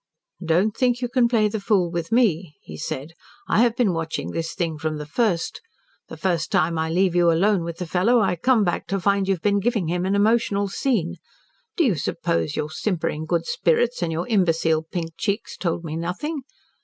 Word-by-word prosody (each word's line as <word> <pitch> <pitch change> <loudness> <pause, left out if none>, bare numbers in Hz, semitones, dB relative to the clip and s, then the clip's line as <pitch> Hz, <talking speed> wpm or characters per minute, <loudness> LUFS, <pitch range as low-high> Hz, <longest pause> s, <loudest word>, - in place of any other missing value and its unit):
"'Don't 180 +6 +2
think 245 -2 +1
you 250 - -1
can 240 0 +3
play 225 -3 +3
the 215 +1 -3
fool 195 -4 +1
with 170 -1 -4
me,' 185 -10 +2
he 80 - -9
said. 140 - -5 0.3
'I - - +2
have 235 -1 +3
been 235 -7 +2
watching 165 -1 -3
this 165 0 -4
thing 165 -3 -1
from 155 0 -2
the 150 - -6
first. 175 +1 -1 0.5
The - - -9
first 175 -4 -1
time 165 +2 +2
I 160 0 -1
leave 180 +2 +2
you 175 -1 +4
alone 190 +2 +2
with 165 0 -5
the 180 - -4
fellow, 185 +9 +3
I 190 -4 +2
come 230 +5 +3
back 175 -3 -1
to 195 +1 -1
find 200 +1 +1
you 195 - +2
have 170 - -16
been 205 -1 +3
giving 210 -5 0
him 175 +1 -1
an 195 - +1
emotional 205 -1 +2
scene. 190 -6 -1 0.6
Do 340 - +4
you 230 - +3
suppose 165 0 -1
your 150 0 -3
simpering 160 -5 -2
good 170 0 0
spirits 230 +11 +1
and 170 -2 -1
your 165 +2 -3
imbecile 165 -7 +2
pink 165 -2 -3
cheeks 205 +1 -2
told 170 -1 -2
me 160 -1 -5
nothing? 250 - -4
180 Hz, 205 wpm, -23 LUFS, 165-215 Hz, 0.6 s, you